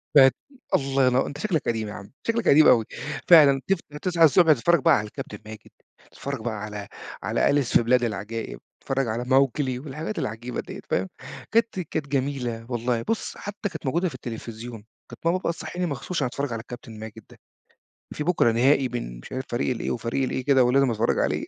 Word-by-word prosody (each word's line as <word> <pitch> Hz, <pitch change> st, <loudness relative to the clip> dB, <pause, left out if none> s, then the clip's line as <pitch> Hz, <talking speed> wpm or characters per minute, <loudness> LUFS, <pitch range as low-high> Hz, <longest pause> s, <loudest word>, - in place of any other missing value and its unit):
بقِت 135 Hz, -2 st, +8 dB, 0.4 s
الله 135 Hz, -1 st, +2 dB
ينوّ 125 Hz, +1 st, +2 dB
أنت 145 Hz, -, -7 dB
شكلك 165 Hz, -2 st, 0 dB
قديم 110 Hz, -2 st, -1 dB
يا 105 Hz, -, -6 dB
عم 100 Hz, -, -10 dB, 0.2 s
شكلك 230 Hz, 0 st, 0 dB
قديم 155 Hz, +2 st, +7 dB
أوي، 115 Hz, -3 st, +5 dB, 0.4 s
فعلًا 145 Hz, -6 st, +7 dB
تف 195 Hz, -2 st, +2 dB, 0.2 s
تصحى 175 Hz, -3 st, +2 dB
الصبح 160 Hz, +1 st, +6 dB
تتفرّج 170 Hz, +7 st, +3 dB
بقى -, -, +6 dB
على 105 Hz, 0 st, -3 dB
الكابتن 105 Hz, 0 st, -8 dB
ماجد، 110 Hz, 0 st, -11 dB, 0.4 s
تتفرّج 140 Hz, -2 st, -5 dB
بقى 115 Hz, 0 st, -2 dB
على 105 Hz, -1 st, -6 dB, 0.4 s
على -, -, +1 dB
أليس 140 Hz, -4 st, +3 dB
في -, -, +1 dB
بلاد 125 Hz, +1 st, +3 dB
العجائب 110 Hz, +1 st, -4 dB, 0.2 s
تتفرّج 135 Hz, -1 st, -1 dB
على 115 Hz, +2 st, -2 dB
ماوكلي 130 Hz, 0 st, +2 dB
والحاجات 155 Hz, +8 st, -5 dB
العجيبة 115 Hz, +3 st, -4 dB
دِيَّة، -, -, -9 dB
فاهم، 95 Hz, -, 0 dB, 0.4 s
كانت 225 Hz, -3 st, +2 dB
كانت 155 Hz, -3 st, -3 dB
جميلة 130 Hz, -4 st, -2 dB
والله، 120 Hz, -1 st, -1 dB
بُصّ 225 Hz, -, -3 dB
حتّى 205 Hz, 0 st, -5 dB
كانت 170 Hz, -, -8 dB
موجودة 170 Hz, +7 st, +1 dB
في 135 Hz, -, -11 dB
التلفزيون، 115 Hz, -2 st, -8 dB, 0.2 s
كانت -, -, -13 dB
ماما 170 Hz, +2 st, +3 dB
بقى 175 Hz, -2 st, -1 dB
تصحّيني 170 Hz, +2 st, -4 dB
مخصوص 165 Hz, +4 st, -4 dB
عشان 145 Hz, -, +1 dB
أتفرّج 135 Hz, +1 st, -3 dB
على 115 Hz, -, -4 dB
الكابتن 115 Hz, -2 st, -10 dB
ماجد 110 Hz, 0 st, -9 dB
ده، -, -, -17 dB, 0.8 s
في 150 Hz, -, -3 dB
بكرة 160 Hz, -9 st, +3 dB
نهائي 130 Hz, +3 st, +3 dB
بين -, -, -5 dB
مش -, -, -12 dB
عارف 130 Hz, 0 st, -3 dB
فريق 120 Hz, +2 st, -1 dB
ال 120 Hz, -3 st, -2 dB
إيه -, -, -2 dB
وفريق 120 Hz, +3 st, -1 dB
ال -, -, -2 dB
إيه 130 Hz, -, -3 dB
كده، 135 Hz, -2 st, +5 dB
ولازم 135 Hz, +1 st, +3 dB
أتفرّج 115 Hz, 0 st, +1 dB
عليه، -, -, 0 dB
130 Hz, 200 wpm, -25 LUFS, 115-150 Hz, 0.8 s, بقِت